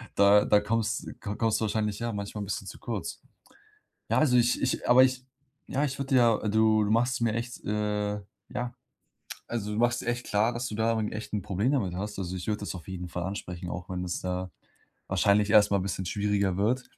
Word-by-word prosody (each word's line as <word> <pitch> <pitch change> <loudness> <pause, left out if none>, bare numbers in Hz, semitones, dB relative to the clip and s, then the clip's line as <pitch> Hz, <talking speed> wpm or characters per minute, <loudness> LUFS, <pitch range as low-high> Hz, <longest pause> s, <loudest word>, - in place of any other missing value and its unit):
da 100 +1 +6
da 105 - +5
komms 115 +2 -1 0.2
ko 105 -2 -4
kommst 115 -1 +1
du - - +1
wahrscheinlich 105 -1 -1
ja 115 0 -2
manchmal 100 +1 -5
'n - - -5
bisschen 100 - -4
zu - - -9
kurz. - - -5 0.9
Ja, - - +3
also, 130 -5 +4
ich 120 0 +3
ich 130 - -1
aber 125 +1 +8
ich 130 0 -1 0.4
ja, 140 +2 0
ich 140 -2 -2
würde 135 -1 -1
ja 115 -3 +5
du 110 0 +4
du 105 - -1
machst 120 +3 +2
es 120 - -3
mir 115 -2 +1
echt, 120 +1 -5
äh, 105 0 -1 0.3
ja 120 0 -4 0.8
also, 105 -3 -2
du 105 - -2
machst 120 0 +2
echt 120 +1 -2
klar, 105 +3 +2
dass 120 +1 -3
du - - -6
da 110 +1 +1
'n 110 -1 -2
echt 110 +1 -6
'n 105 -2 -1
Problem 100 +9 0
damit 100 -11 0
hast. 105 +2 -4
Also, 90 -1 -3
ich 90 - -6
würde 105 -1 0
das 100 - -4
auf 90 0 -9
jeden 90 -1 -5
Fall 90 +1 -4
ansprechen, 90 -2 -5
auch 90 0 -6
wenn 90 -1 -3
es, 90 0 -4
äh, 90 0 -2 0.6
wahrscheinlich 100 +1 +3
erst 105 -1 +6
mal 100 - +4
'n 95 - -1
bisschen 95 -1 -3
schwieriger 100 0 0
wird. 120 +6 +1
105 Hz, 225 wpm, -28 LUFS, 100-120 Hz, 0.9 s, aber